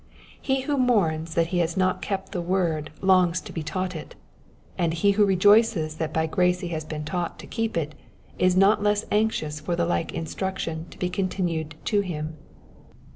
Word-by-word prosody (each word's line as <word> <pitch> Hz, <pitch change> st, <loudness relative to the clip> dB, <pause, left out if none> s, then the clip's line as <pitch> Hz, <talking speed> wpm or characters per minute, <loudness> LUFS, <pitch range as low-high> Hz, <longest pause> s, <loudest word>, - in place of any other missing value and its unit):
He 265 Hz, -1 st, 0 dB
who 285 Hz, +2 st, -1 dB
mourns 165 Hz, -10 st, +1 dB
that 165 Hz, 0 st, +2 dB
he 180 Hz, -, +2 dB
has 170 Hz, 0 st, 0 dB
not 185 Hz, -1 st, +1 dB
kept 195 Hz, -1 st, -3 dB
the 180 Hz, -, -2 dB
word 170 Hz, -4 st, 0 dB
longs 185 Hz, -2 st, +4 dB
to -, -, -10 dB
be 165 Hz, -, -3 dB
taught 185 Hz, +3 st, -3 dB
it, 155 Hz, -, -8 dB, 0.6 s
and 170 Hz, -1 st, 0 dB
he 200 Hz, +5 st, +3 dB
who 205 Hz, +1 st, +3 dB
rejoices 195 Hz, -4 st, +4 dB
that 160 Hz, -1 st, -2 dB
by 160 Hz, 0 st, +1 dB
grace 180 Hz, +2 st, +1 dB
he 175 Hz, -, -4 dB
has 160 Hz, -2 st, -3 dB
been 150 Hz, 0 st, -6 dB
taught 175 Hz, +2 st, -3 dB
to -, -, -10 dB
keep 225 Hz, -5 st, -2 dB
it 155 Hz, -2 st, -2 dB, 0.5 s
is 185 Hz, 0 st, +3 dB
not 200 Hz, +2 st, +5 dB
less 205 Hz, 0 st, +1 dB
anxious 205 Hz, -8 st, 0 dB
for 175 Hz, +2 st, -2 dB
the 170 Hz, 0 st, +1 dB
like 165 Hz, -1 st, -1 dB
instruction 165 Hz, -1 st, -4 dB
to -, -, -14 dB
be 180 Hz, -, -1 dB
continued 175 Hz, -4 st, -2 dB
to 205 Hz, -, +2 dB
him. 160 Hz, -4 st, -4 dB
180 Hz, 190 wpm, -25 LUFS, 160-195 Hz, 0.6 s, not